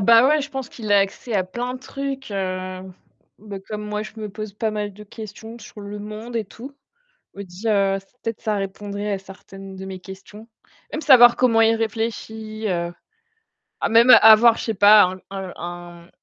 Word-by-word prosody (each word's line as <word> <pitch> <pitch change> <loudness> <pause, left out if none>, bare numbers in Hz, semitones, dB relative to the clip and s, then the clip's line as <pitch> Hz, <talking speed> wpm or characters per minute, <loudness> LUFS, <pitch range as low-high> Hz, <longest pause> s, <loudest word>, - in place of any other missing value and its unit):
bah, 230 +4 +6
ouais, 305 +2 +3
je 285 - -5
pense 265 -3 -6
qu'il 215 -3 -7
a 205 -1 +6
accès 200 +4 -3
à 190 -2 +1
plein 245 +7 -5
de - - -7
trucs, 275 0 -6
heu, 185 -1 -4 0.6
bah, 205 -1 -8
comme 210 +2 -7
moi, 210 0 -3
je 215 - -9
me 215 -1 -6
pose 215 0 -8
pas 220 +1 -2
mal 210 -1 -4
de 210 +1 -12
questions 220 +2 -10
sur 210 -1 -12
le 205 +1 -7
monde 215 +3 -8
et 225 -3 -2
tout, 265 +8 -11 0.6
je - - -17
me - - -5
dis, 190 +5 -6
heu, 195 -2 +2 0.2
peut-être 225 -1 -4
ça 215 -2 -1
répondrait 200 +1 -4
à 195 - -1
certaines 195 0 -12
de 190 - -8
mes 190 -1 -7
questions. 195 +4 -12 0.4
Même 310 - -4
savoir 245 -4 +7
comment 235 -3 +3
il 225 0 +4
réfléchit, 220 -1 -4
heu, 170 -1 -2 0.9
à - - 0
même 230 +2 +5
avoir, 220 +1 +7
je - - -5
sais 225 - -1
pas, 205 +2 +7 0.3
un 190 -2 -6
un 175 0 -9
210 Hz, 195 wpm, -22 LUFS, 195-230 Hz, 0.9 s, savoir